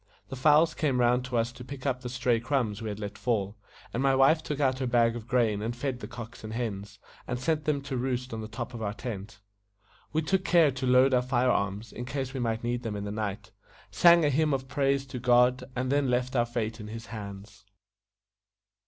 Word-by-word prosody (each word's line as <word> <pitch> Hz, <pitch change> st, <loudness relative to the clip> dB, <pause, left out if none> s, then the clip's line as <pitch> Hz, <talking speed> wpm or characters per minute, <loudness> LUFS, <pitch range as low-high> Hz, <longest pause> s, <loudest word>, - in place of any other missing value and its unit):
The 135 Hz, -, -5 dB
fowls 155 Hz, +5 st, +4 dB
came 140 Hz, -6 st, 0 dB
round 125 Hz, +1 st, +2 dB
us 120 Hz, -1 st, +1 dB
to 125 Hz, +1 st, -11 dB
pick 135 Hz, +1 st, -9 dB
up 130 Hz, -2 st, 0 dB
the 125 Hz, -, -5 dB
stray 125 Hz, -2 st, +1 dB
crumbs 115 Hz, -4 st, -1 dB
we 110 Hz, -, -3 dB
had 105 Hz, -, -5 dB
let 105 Hz, -1 st, -6 dB
fall, 105 Hz, -4 st, -1 dB, 0.4 s
and 120 Hz, -, -1 dB
my 135 Hz, -1 st, +3 dB
wife 135 Hz, +4 st, +5 dB
took 150 Hz, -2 st, -4 dB
out 130 Hz, -2 st, +1 dB
her 130 Hz, -, -1 dB
bag 120 Hz, -1 st, +3 dB
of 115 Hz, -1 st, -7 dB
grain 115 Hz, -4 st, +1 dB
and 115 Hz, +2 st, -3 dB
fed 125 Hz, 0 st, -3 dB
the -, -, -7 dB
cocks 115 Hz, -2 st, -9 dB
and 110 Hz, 0 st, -6 dB
hens, 100 Hz, -4 st, -4 dB, 0.3 s
and 125 Hz, 0 st, -2 dB
sent 150 Hz, +2 st, 0 dB
them 145 Hz, -2 st, +1 dB
to 140 Hz, -1 st, -4 dB
roost 125 Hz, 0 st, -2 dB
on 110 Hz, -, -4 dB
the 110 Hz, -, -6 dB
top 120 Hz, +2 st, -6 dB
of 115 Hz, -, -7 dB
our 105 Hz, -1 st, -3 dB
tent. 110 Hz, -3 st, -7 dB, 0.7 s
We 160 Hz, +2 st, 0 dB
took 190 Hz, +4 st, +1 dB
care 170 Hz, -6 st, +5 dB
to 130 Hz, 0 st, -3 dB
load 130 Hz, +1 st, +5 dB
our 125 Hz, -, +4 dB
fire 125 Hz, 0 st, +2 dB
arms, 100 Hz, +1 st, -2 dB
in 120 Hz, -, -6 dB
case 135 Hz, 0 st, -4 dB
we 135 Hz, -, -3 dB
might 115 Hz, -2 st, -1 dB
need 120 Hz, 0 st, -1 dB
them 115 Hz, -4 st, -4 dB
in 100 Hz, -, -4 dB
the 100 Hz, -, -4 dB
night; 105 Hz, -2 st, -4 dB, 0.4 s
sang 170 Hz, -2 st, +6 dB
a 145 Hz, -, +3 dB
hymn 150 Hz, +1 st, +2 dB
of 130 Hz, 0 st, -5 dB
praise 135 Hz, 0 st, +1 dB
to 130 Hz, -2 st, -6 dB
God, 125 Hz, +1 st, +4 dB
and 130 Hz, +1 st, -1 dB
then 140 Hz, -2 st, +2 dB
left 125 Hz, +1 st, 0 dB
our 120 Hz, -1 st, +2 dB
fate 115 Hz, -1 st, -3 dB
in 105 Hz, -, -7 dB
His 115 Hz, +2 st, -7 dB
hands. 100 Hz, -1 st, -9 dB
125 Hz, 230 wpm, -28 LUFS, 115-135 Hz, 0.7 s, sang